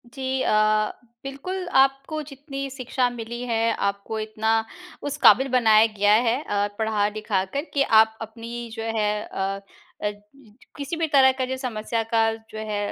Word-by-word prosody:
जी 260 Hz, +2 st, -3 dB
अ, 215 Hz, -1 st, +2 dB, 0.3 s
बिल्कुल, 355 Hz, +8 st, -5 dB
आपको 270 Hz, +3 st, +2 dB
जितनी 275 Hz, 0 st, -6 dB
शिक्षा 255 Hz, -1 st, -1 dB
मिली 240 Hz, 0 st, -6 dB
है, 230 Hz, -1 st, +1 dB
आपको 200 Hz, +2 st, -2 dB
इतना 215 Hz, +1 st, -1 dB, 0.5 s
उस 290 Hz, 0 st, -3 dB
काबिल 265 Hz, +1 st, +6 dB
बनाया 220 Hz, -2 st, +6 dB
गया 205 Hz, +1 st, +4 dB, 0.2 s
है 250 Hz, +5 st, 0 dB
अ, 205 Hz, -4 st, 0 dB
पढ़ा-लिखा 210 Hz, -2 st, 0 dB
कर 280 Hz, -, -1 dB
कि 280 Hz, -, +3 dB, 0.2 s
आप 220 Hz, 0 st, -1 dB
अपनी 230 Hz, +1 st, -7 dB
जो 225 Hz, -, -5 dB
है 210 Hz, -1 st, +2 dB, 0.2 s
अ 195 Hz, +1 st, -2 dB, 0.4 s
अ, 210 Hz, -, +1 dB
ज 205 Hz, 0 st, -17 dB, 0.6 s
किसी 285 Hz, +3 st, -4 dB
भी 325 Hz, -1 st, 0 dB
तरह 265 Hz, -1 st, +7 dB
का 260 Hz, -, +1 dB
जो 260 Hz, +1 st, -3 dB
समस्या 230 Hz, -3 st, -2 dB
का 230 Hz, -, +3 dB, 0.3 s
जो 215 Hz, -, -8 dB
है 210 Hz, -1 st, -2 dB
230 Hz, 165 wpm, -24 LUFS, 215-270 Hz, 0.6 s, तरह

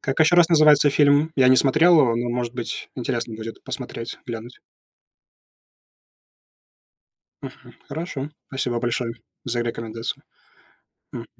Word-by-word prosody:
Как 135 Hz, +3 st, -3 dB
ещё 160 Hz, +3 st, +5 dB
раз 175 Hz, -2 st, +6 dB
называется 150 Hz, -3 st, +5 dB
фильм? 145 Hz, +2 st, +3 dB
Я 130 Hz, -2 st, +5 dB
не 130 Hz, -, +6 dB
смотрел 155 Hz, +5 st, +5 dB
его, 120 Hz, -5 st, +2 dB
но, 120 Hz, 0 st, -2 dB
может 120 Hz, 0 st, -3 dB
быть, 120 Hz, -2 st, -5 dB
интересно 120 Hz, -2 st, -3 dB
будет 110 Hz, +1 st, -8 dB
посмотреть, 115 Hz, 0 st, -7 dB
глянуть. 120 Hz, 0 st, -8 dB, 2.8 s
Мгм. -, -, -11 dB
Хорошо, 150 Hz, -2 st, -5 dB, 0.2 s
спасибо 125 Hz, -3 st, -2 dB
большое, 120 Hz, 0 st, -2 dB, 0.3 s
за 120 Hz, -1 st, -2 dB
рекомендацию. 115 Hz, -1 st, -5 dB, 0.9 s
Мгм. -, -, -7 dB
125 Hz, 120 wpm, -22 LUFS, 120-145 Hz, 2.8 s, раз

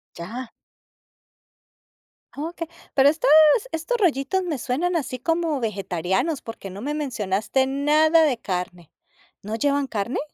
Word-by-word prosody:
Ya. 230 Hz, +8 st, -7 dB, 1.9 s
Okey, 330 Hz, +3 st, -5 dB, 0.3 s
pero 275 Hz, 0 st, +5 dB
estos 295 Hz, -3 st, 0 dB, 0.4 s
estos 325 Hz, +10 st, -2 dB
rollitos 350 Hz, -, +1 dB
me 320 Hz, -6 st, -2 dB
suenan 315 Hz, +9 st, -1 dB
así 260 Hz, -5 st, -2 dB
como 325 Hz, -1 st, 0 dB
vegetarianos, 195 Hz, -, -1 dB
porque 225 Hz, -4 st, -8 dB
no 195 Hz, +3 st, -9 dB
me 290 Hz, +3 st, -3 dB
mencionaste 245 Hz, -3 st, -1 dB
nada 305 Hz, +4 st, +4 dB
de 270 Hz, -6 st, +2 dB
carne. 180 Hz, -5 st, -5 dB, 0.5 s
¿No 215 Hz, +2 st, -4 dB
llevan 280 Hz, +3 st, +1 dB
carne? 215 Hz, +2 st, -2 dB
270 Hz, 120 wpm, -23 LUFS, 215-315 Hz, 1.9 s, pero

